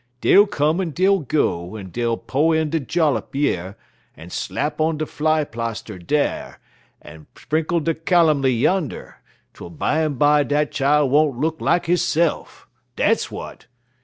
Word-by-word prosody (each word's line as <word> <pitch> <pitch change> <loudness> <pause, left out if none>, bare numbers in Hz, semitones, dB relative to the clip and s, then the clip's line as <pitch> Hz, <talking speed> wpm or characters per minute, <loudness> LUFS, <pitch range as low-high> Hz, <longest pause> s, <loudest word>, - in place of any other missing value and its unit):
Dey'll 205 +10 +5
come 155 0 0
en 180 - -2
dey'll 190 +5 +2
go, 110 - -1
en 95 -4 -8
dey'll 115 +1 -1
po' 155 +4 0
in 160 -1 0
der 165 - 0
jollup 150 0 -1
yer, 95 -10 -1 0.4
en 80 +3 -12
slap 150 +1 -3
on 160 0 +1
der 155 - -2
fly 155 +1 0
plarster 115 -5 -6
dar, 145 - -2 0.4
en 75 0 -13
sprinkle 160 +2 -1
der 165 - +1
calomy 160 -5 +2
yander, 145 +7 -1 0.3
twel - - -10
bimeby 150 - +1
dat 150 +2 0
chile 145 0 +2
won't 145 -1 +2
look 160 +2 -2
like 175 0 +1
hisse'f. 170 -1 0 0.3
Dat's - - +1
w'at! - - -9
150 Hz, 145 wpm, -21 LUFS, 125-160 Hz, 0.4 s, Dey'll